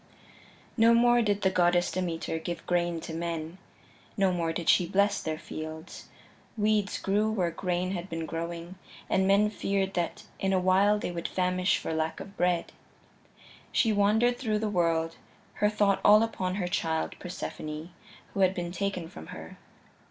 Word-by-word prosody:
III - - -25 0.4
No 230 +1 +7
more 240 +1 +5
did 205 -2 0
the 190 - +3
Goddess 175 -1 +3
Demeter 170 -3 -2
give 170 +1 -5
grain 175 -1 0
to 160 - -7
men; 165 +1 -4 0.6
no 195 -2 +3
more 165 -2 0
did 165 0 -4
she 175 - +5
bless 200 +1 +2
their 155 -1 -3
fields: 155 +1 -8 0.5
weeds 210 -1 +1
grew 210 +2 +1
where 180 -6 0
grain 180 +1 -2
had 185 0 -4
been 165 -1 -3
growing, 170 +2 -5 0.3
and 190 0 +3
men 205 +2 +4
feared 195 -2 -1
that 175 -2 -2 0.2
in 195 0 +1
a 190 - +3
while 190 +3 +4
they 205 - -3
would 170 -1 -3
famish 185 +1 +1
for - - -4
lack 160 0 -1
of 195 - -9
bread. 175 -1 0 1.0
She 225 -2 +3
wandered 220 +4 +3
through 220 -5 0
the 215 0 -1
world, 165 -3 0 0.4
her 210 - +5
thought 205 -2 +2
all 210 +2 +7
upon 190 -5 -2
her 185 -3 -1
child, 165 -4 -1
Persephone, 155 -2 -6 0.4
who - - -4
had 190 0 +4
been 175 -1 -3
taken 185 -2 -3
from 80 - -11
her. - - -10
185 Hz, 170 wpm, -28 LUFS, 170-200 Hz, 1.0 s, No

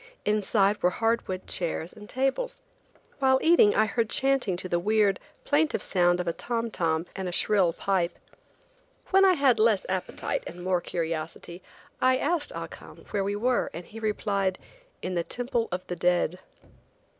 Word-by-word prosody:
Inside 210 -1 +2
were 180 - +4
hard 225 +5 0
wood 185 0 -4
chairs 170 -1 -3
and 210 -1 -13
tables. 270 - -1 0.6
While 265 -1 +4
eating 320 -11 +5
I 220 - +4
heard 225 +1 -1
chanting 265 -10 +1
to 185 - -5
the 175 -1 0
weird, 205 0 +2 0.2
plaintive 300 +1 +1
sound 175 -1 +2
of 180 - -3
a 170 - +1
tom 235 +2 -3
tom 165 -3 0
and 190 -2 -3
a - - -5
shrill 190 -1 +2
pipe. 180 0 -1 0.9
When 385 0 +6
I 375 - +6
had 270 -8 +3
less 215 -3 +3
appetite 185 -1 -2
and 175 +1 -8
more 180 -1 +1
curiosity, 165 +1 -4 0.4
I 255 0 +4
asked 295 +2 0
Ah - - -4
Cum - - -13
where 200 -2 0
we 200 +1 -1
were, 245 +4 +1
and 170 +1 -7
he 225 - -10
replied: 200 -3 -1 0.5
"in 185 - -2
the 170 -1 0
Temple 240 +2 -2
of 180 +1 -3
the 180 - -4
Dead." 180 0 +1
200 Hz, 170 wpm, -27 LUFS, 180-240 Hz, 0.9 s, When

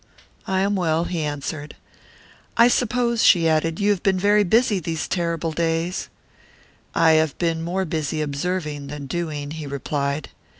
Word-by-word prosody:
"I 190 0 +1
am 200 +1 +1
well," 165 -3 +1
he 175 -1 -3
answered. 145 0 -4 0.8
"I 235 +1 +7
suppose," 240 -1 +1
she 170 -3 +6
added, 160 +1 +1
"you 205 0 +3
have 195 -3 0
been 190 -1 +2
very 205 +2 +4
busy 220 +1 +3
these 160 -2 -3
terrible 170 -2 -1
days." 165 +2 -1 0.9
"I 160 - +5
have 155 -2 +2
been 165 -2 0
more 180 +3 -1
busy 155 -2 -2
observing 150 0 -3
than 145 0 -6
doing," 150 -1 -4
he 155 -2 -6
replied. 140 +1 -2
165 Hz, 155 wpm, -23 LUFS, 150-185 Hz, 0.9 s, I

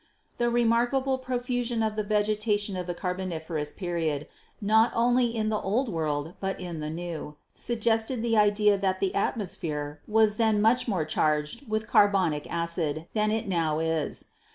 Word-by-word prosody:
The 240 0 +2
remarkable 240 +3 +2
profusion 245 -2 -1
of 215 -1 -1
the 215 - 0
vegetation 210 -1 0
of 180 -1 -4
the 175 - -3
Car 180 +1 -2
boniferous 160 -5 -4
period, 165 -5 -2 0.3
not 220 +3 +4
only 245 +2 +3
in 225 -2 -1
the 215 -1 0
Old 230 +6 0
World 155 -2 -2
but 195 0 -3
in 175 -3 -5
the 150 0 -4
New, 160 -2 -5 0.2
suggested 225 +1 0
the 230 -1 +1
idea 210 -1 +4
that 190 -1 0
the 195 - 0
atmosphere 155 -8 -2
was 215 -1 +3
then 220 -2 +3
much 225 +5 +3
more 185 -8 0
charged 155 - -1
with 215 0 -1
carbonic 185 -7 +3
acid 170 -2 -2
than 215 -1 +1
it 220 0 -1
now 165 -5 0
is. 160 -1 -2
205 Hz, 160 wpm, -27 LUFS, 165-225 Hz, 0.3 s, not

